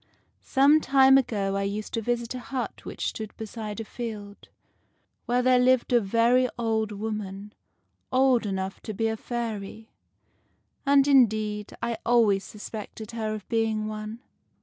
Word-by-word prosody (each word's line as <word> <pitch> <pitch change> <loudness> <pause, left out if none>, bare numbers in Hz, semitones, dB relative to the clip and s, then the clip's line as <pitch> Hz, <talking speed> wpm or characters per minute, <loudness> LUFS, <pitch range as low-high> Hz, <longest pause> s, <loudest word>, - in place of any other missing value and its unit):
Some 285 +3 +4
time 270 -1 +6
ago 205 -7 +1
I 200 - 0
used 205 +2 -4
to 230 - -1
visit 235 +1 -2
a 255 - -5
hut 255 0 -5
which - - -3
stood 215 -2 -8
beside 220 -1 -6
a 225 - -5
field, 210 -3 -7 0.8
where 245 +1 +2
there 255 0 +5
lived 255 0 +3
a 240 - +5
very 235 +5 +3
old 220 -2 0
woman, 210 -1 -5 0.6
old 255 -3 +3
enough 190 0 -3
to 215 - -6
be 225 +3 0
a 220 - -1
fairy; 220 -2 -5 1.0
and, 280 0 +5
indeed, 215 -6 +2
I 235 -2 -2
always 220 -5 +3
suspected 215 +1 -8
her 220 -2 -3
of 210 - -9
being 225 -2 0
one. 215 +2 -6
225 Hz, 150 wpm, -26 LUFS, 210-245 Hz, 1.0 s, time